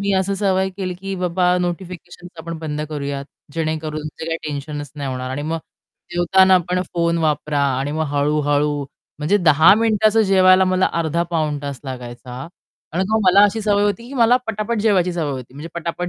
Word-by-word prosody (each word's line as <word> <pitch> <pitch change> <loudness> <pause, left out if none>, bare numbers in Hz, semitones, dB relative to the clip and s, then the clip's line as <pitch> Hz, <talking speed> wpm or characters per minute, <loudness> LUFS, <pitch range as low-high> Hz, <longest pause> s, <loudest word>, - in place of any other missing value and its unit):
मी 200 0 0
अशी 195 +1 0
सवय 190 -1 +1
केली, 185 -2 -3
की 195 +2 -6
बाबा 180 +1 +2
नोटिफिकेशन्स 175 0 -6
आपण 170 0 -6
बंद 150 -2 -4
करूयात, 140 -2 -4 0.3
जेणेकरून 155 -1 -3 0.2
जे - - -5
काही 165 0 -2
टेन्शनच 145 0 -6
नाही 140 -2 -3
होणार 130 0 -4
आणि 145 +2 -4
मग 165 +2 -2 0.5
जेवताना 185 +2 +5
पण 180 0 +1
फोन 170 0 +1
वापरा 150 -2 0 0.2
आणि 140 +2 -2
मग 160 0 -1
हळू-हळू 145 0 +1 0.3
म्हणजे 155 +7 +2
10 160 -1 +6
मिनिटाचं 220 0 +3
जेवायला 190 -1 +5
मला 185 0 +2
अर्धा-पाऊण 160 -2 -1
तास 140 -2 -5
लागायचा. 125 -1 -8 0.6
आणि 185 +3 0
मग 220 0 +2
मला 190 +2 +6
अशी 205 +2 +1
सवय 205 -1 +2
होती 230 +3 -1
की 275 - -9
मला 240 -1 +5
पटापट 215 +1 -2
जेवायची 185 -5 +2
सवय 160 -4 -2
होती. 130 -1 -7
म्हणजे 150 +4 -8
पटापट 170 +1 -3
170 Hz, 175 wpm, -20 LUFS, 150-190 Hz, 0.6 s, 10